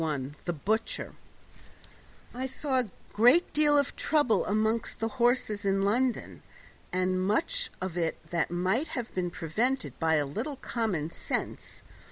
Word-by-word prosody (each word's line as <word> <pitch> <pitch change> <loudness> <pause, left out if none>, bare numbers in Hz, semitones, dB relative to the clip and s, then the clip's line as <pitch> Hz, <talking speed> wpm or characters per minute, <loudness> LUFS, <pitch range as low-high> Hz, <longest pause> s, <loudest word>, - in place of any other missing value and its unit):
41 145 -3 -2
The 175 - -1
Butcher 215 +9 -1 1.2
I 260 +2 -3
saw 265 0 -1
a 245 -4 -2 0.2
great 245 - +5
deal 295 -1 +5
of 285 -1 +1
trouble 290 -7 +2
among 220 +2 +1
the 225 - -1
horses 240 -3 +1
in 195 0 +1
London, 240 +5 0 0.5
and 185 0 +1
much 330 - +1
of 185 -2 -4
it 165 -2 0 0.3
might 185 - 0
have 245 -6 -5
been 180 -1 -1
prevented 215 - -1
by 160 -1 +3
a 150 -1 +2
little 225 - -4
common 200 - -2
sense. - - -4
220 Hz, 140 wpm, -29 LUFS, 180-255 Hz, 1.2 s, great